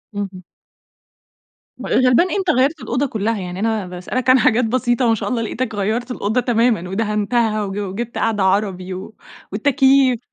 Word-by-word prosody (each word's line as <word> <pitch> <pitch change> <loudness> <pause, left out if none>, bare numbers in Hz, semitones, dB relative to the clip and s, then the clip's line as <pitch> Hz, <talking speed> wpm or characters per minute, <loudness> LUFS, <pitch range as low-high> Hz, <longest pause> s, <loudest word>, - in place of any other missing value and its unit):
اهم. 195 -2 -5 1.4
غلبان 255 +7 +3
إيه! - - -1
أنت 380 -3 -1
غيرت 280 +2 +2
الأوضة 250 +4 -1
كلّها، 220 -3 -2
يعني 180 0 -6
أنا 220 -3 -1
باسألك 185 +8 -3
عن 255 0 +6
حاجات 235 +2 +3
بسيطة 240 +1 +1
ما 225 - +3
شاء - - -4
الله 240 -2 -1
لقيتك 225 0 -3
غيرت 225 +5 -2
الأوضة 235 +1 -1
تمامًا، 230 -6 +1
ودهنتها 215 +1 0
وج 195 0 -5
وجبت 205 +4 -5
قعدة 215 -3 0
عربي 190 -1 0
و 190 +4 -8 0.4
والتكييف. 265 +1 +3
225 Hz, 155 wpm, -19 LUFS, 200-250 Hz, 1.4 s, عن